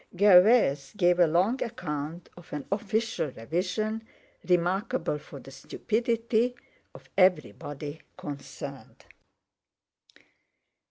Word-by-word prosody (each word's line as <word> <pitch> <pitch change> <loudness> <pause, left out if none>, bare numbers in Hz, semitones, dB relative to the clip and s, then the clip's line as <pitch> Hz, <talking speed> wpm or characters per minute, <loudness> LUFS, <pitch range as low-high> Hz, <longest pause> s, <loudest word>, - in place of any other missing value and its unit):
Gervais 180 - +5
gave 175 -1 +3
a 175 - +6
long 185 +11 +1
account 165 -6 -4
of 175 - -15
an 145 -1 -4
official 215 -3 -1
revision, 180 - -2 0.5
remarkable 180 -2 +1
for 145 -1 -11
the 135 - -13
stupidity 230 - -1 0.4
of - - -14
everybody 150 - 0 0.2
concerned. 145 -2 -8
180 Hz, 90 wpm, -28 LUFS, 150-220 Hz, 0.5 s, a